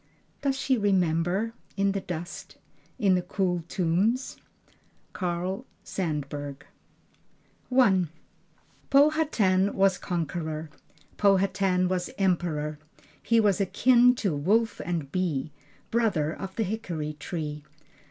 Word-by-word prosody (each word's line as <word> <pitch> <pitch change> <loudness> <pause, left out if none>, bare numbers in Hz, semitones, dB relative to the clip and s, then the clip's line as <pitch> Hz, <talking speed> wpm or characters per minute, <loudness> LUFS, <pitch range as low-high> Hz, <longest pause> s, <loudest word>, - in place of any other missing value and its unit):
does 275 -1 0
she 260 -3 +1
remember 190 +2 +1 0.2
in 195 0 +2
the 195 0 -2
dust 175 -1 -7 0.4
in 195 -3 +3
the 180 - +2
cool 180 -1 -1
tombs?" 195 +10 0 0.8
Carl 180 +1 -2 0.2
Sandburg. 145 -5 -4 1.1
I 205 -8 +4 0.8
Powhatan 275 -10 +3
was 195 -2 +3
conqueror, 160 -3 -3 0.5
Powhatan 195 -2 +3
was 180 +2 -1
emperor. 160 -6 0 0.4
He 230 -1 +3
was 205 -3 +3
akin 245 +5 +5
to 195 -10 -1
wolf 215 +10 +1
and 165 -6 -3
bee, 160 -5 -1 0.4
Brother 200 -10 +1
of 190 -1 -7
the 225 - 0
hickory 180 -8 -3
tree. 150 -2 -5
185 Hz, 105 wpm, -27 LUFS, 165-205 Hz, 1.1 s, akin